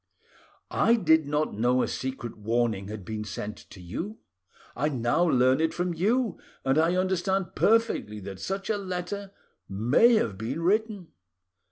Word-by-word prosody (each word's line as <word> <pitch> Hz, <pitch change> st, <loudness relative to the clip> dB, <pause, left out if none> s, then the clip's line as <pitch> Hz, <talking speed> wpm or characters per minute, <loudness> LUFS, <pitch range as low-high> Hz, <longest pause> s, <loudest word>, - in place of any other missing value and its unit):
I 230 Hz, -, +4 dB
did 160 Hz, -8 st, +3 dB
not 150 Hz, +1 st, 0 dB
know 125 Hz, +4 st, +2 dB
a -, -, -1 dB
secret 130 Hz, -3 st, -5 dB
warning 110 Hz, -2 st, -1 dB
had 105 Hz, -2 st, -7 dB
been 110 Hz, +1 st, -4 dB
sent 105 Hz, +1 st, -5 dB
to 95 Hz, -, -12 dB
you: 165 Hz, -, -6 dB, 0.6 s
I 150 Hz, +4 st, 0 dB
now 125 Hz, +4 st, +1 dB
learn 130 Hz, -2 st, +3 dB
it 160 Hz, -, 0 dB
from 175 Hz, 0 st, -1 dB
you, 220 Hz, +7 st, 0 dB, 0.3 s
and 135 Hz, +3 st, +3 dB
I 165 Hz, +3 st, +3 dB
understand 190 Hz, +1 st, 0 dB
perfectly 225 Hz, -, +2 dB
that 95 Hz, 0 st, -8 dB
such 195 Hz, -, -3 dB
a 210 Hz, -, 0 dB
letter, 190 Hz, +1 st, -4 dB, 0.4 s
may 120 Hz, -, +4 dB
have 105 Hz, -, 0 dB
been 130 Hz, +9 st, -3 dB
written. 205 Hz, -1 st, 0 dB
160 Hz, 155 wpm, -27 LUFS, 115-190 Hz, 0.6 s, I